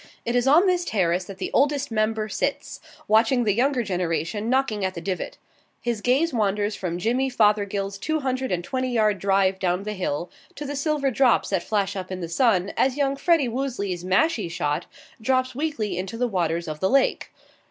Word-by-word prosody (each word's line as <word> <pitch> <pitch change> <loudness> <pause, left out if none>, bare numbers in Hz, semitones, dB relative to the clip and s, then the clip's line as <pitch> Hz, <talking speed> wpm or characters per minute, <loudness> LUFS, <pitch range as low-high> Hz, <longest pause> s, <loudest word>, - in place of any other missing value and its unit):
It 235 - -1
is 245 +1 +2
on 320 +8 +6
this 360 -2 +2
terrace 185 - 0
that 195 0 -9
the 190 - -4
Oldest 285 -1 +2
Member 215 0 0
sits, 210 - -3 0.3
watching 225 +3 +4
the 210 -3 +2
younger 250 +3 +1
generation 185 +2 -2
knocking 255 -6 +1
at 190 0 -1
the - - -4
divot. 185 +2 -4 0.4
His 235 -3 -2
gaze 270 +8 +2
wanders 205 -1 0
from 175 -2 -3
Jimmy 245 +8 0
Fothergill's 205 -4 +1
two 315 +7 -1
hundred 260 -2 -2
and 175 -1 -1
twenty 255 +4 -2
yard 215 -4 +2
drive 195 0 +2
down 180 0 0
the 210 +1 -4
hill 175 -3 -3 0.2
to 295 - -6
the 290 +1 -4
silver 285 -1 0
drops 250 -3 +3
that 190 -3 +1
flash 200 +1 -1
up 185 -1 -5
in 185 - -4
the 170 - -4
sun, 195 -1 +2
as 265 +1 +1
young 275 -1 +1
Freddie 305 -1 +2
Woosley's 230 -8 -3
mashie 195 - +1
shot 145 -3 -2 0.3
drops 255 +2 +1
weakly 235 - -2
into 190 +5 -5
the 245 +1 +1
waters 170 -5 -1
of 155 -1 -5
the 190 - +1
lake. 275 0 +2
215 Hz, 195 wpm, -24 LUFS, 190-260 Hz, 0.4 s, on